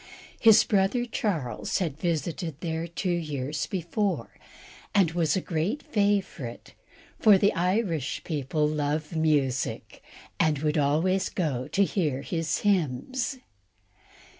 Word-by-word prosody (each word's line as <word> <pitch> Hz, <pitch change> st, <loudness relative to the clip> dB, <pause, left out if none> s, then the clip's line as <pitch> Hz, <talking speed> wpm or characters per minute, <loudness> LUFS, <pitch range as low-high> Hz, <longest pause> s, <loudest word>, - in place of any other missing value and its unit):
His 220 Hz, -3 st, +7 dB
brother 205 Hz, +4 st, +1 dB
Charles 175 Hz, -, -2 dB
had 160 Hz, -6 st, -2 dB
visited 165 Hz, -2 st, -2 dB
there 165 Hz, -1 st, -2 dB
two 175 Hz, +2 st, -2 dB
years 150 Hz, -4 st, -2 dB
before, 190 Hz, +2 st, -2 dB, 0.6 s
and 190 Hz, -5 st, +4 dB
was 165 Hz, -3 st, +1 dB
a 190 Hz, -, 0 dB
great 180 Hz, -, -2 dB
favourite, 200 Hz, -, -1 dB, 0.5 s
for 210 Hz, -3 st, +7 dB
the 200 Hz, +2 st, +3 dB
Irish 180 Hz, -, -1 dB
people 150 Hz, -1 st, -1 dB
love 150 Hz, +1 st, -2 dB
music, 145 Hz, -5 st, 0 dB, 0.4 s
and 155 Hz, -2 st, +3 dB
would 150 Hz, +2 st, 0 dB
always 160 Hz, +7 st, +2 dB
go 135 Hz, -8 st, -2 dB
to 200 Hz, -, +2 dB
hear 150 Hz, -9 st, -1 dB
his 165 Hz, 0 st, -2 dB
hymns. 205 Hz, -, 0 dB
165 Hz, 115 wpm, -27 LUFS, 150-195 Hz, 0.6 s, His